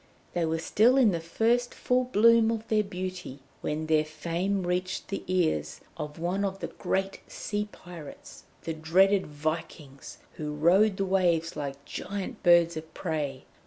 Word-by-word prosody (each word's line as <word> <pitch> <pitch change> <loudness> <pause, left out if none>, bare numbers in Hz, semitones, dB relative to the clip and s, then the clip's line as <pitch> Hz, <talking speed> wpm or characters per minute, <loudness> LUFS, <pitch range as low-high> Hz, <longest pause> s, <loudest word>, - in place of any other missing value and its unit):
They 175 -2 +1
were 160 0 0
still 220 +10 +3
in 245 -6 +5
the 170 - -1
first 230 +9 0
full 250 0 +1
bloom 230 -1 +5
of 225 -1 -3
their 215 -1 +3
beauty 185 -6 -6 0.2
when 155 +1 -2
their 155 -1 +3
fame 170 +5 -2
reached 180 +1 -2
the 195 - -4
ears 160 - 0 0.2
of 150 -2 -6
one 180 +4 -1
of 195 -1 -2
the - - -5
great 195 0 -2
sea 210 0 -4
pirates, 170 -4 -11 0.2
the 165 - -3
dreaded 190 +5 +3
Vikings 150 -2 -5 0.2
who 150 -1 -4
rode 190 +6 +4
the 195 - 0
waves 175 -4 +1
like 140 -1 -5
giant 200 -1 -5
birds 170 -2 +5
of 160 0 -7
prey. 150 -6 -3
175 Hz, 160 wpm, -28 LUFS, 155-200 Hz, 0.2 s, in